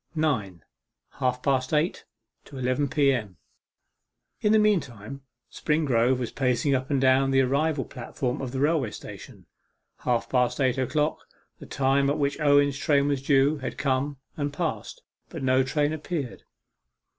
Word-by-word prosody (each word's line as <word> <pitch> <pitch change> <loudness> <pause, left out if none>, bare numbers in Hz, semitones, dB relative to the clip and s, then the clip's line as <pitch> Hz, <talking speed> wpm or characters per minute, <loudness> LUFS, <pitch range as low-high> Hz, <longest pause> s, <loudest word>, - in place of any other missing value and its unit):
9. 105 - -1 0.6
HALF 125 -1 -1
PAST 130 -2 +1
EIGHT 155 +5 0 0.4
TO 140 - -12
ELEVEN 130 +3 0
P.M. 130 - 0 1.0
In 210 - +2
the 220 - +6
meantime, 140 - 0 0.3
Springrove 130 -5 +1
was 125 -2 -4
pacing 130 +1 +1
up 130 0 -1
and 140 -2 +1
down 135 +1 +3
the 135 0 +4
arrival 140 +2 0
platform 125 +1 -4
of 130 -2 -4
the 130 - -3
railway 145 -4 +1
station. - - -11 0.5
Half 120 -2 0
past 125 0 +1
eight 130 -1 +1
o'clock 150 +4 0 0.4
the - - -11
time 140 0 +1
at 145 - 0
which 140 0 -1
Owen's 145 -1 +3
train 145 -2 +2
was 140 -2 -1
due 140 +2 +3
had 130 - -5
come, 140 +1 -1 0.2
and 145 -1 -2
passed, 175 - -4 0.3
but 160 -5 -7
no 130 0 +3
train 145 +3 0
appeared. 155 -4 -5
135 Hz, 150 wpm, -26 LUFS, 130-145 Hz, 1.0 s, the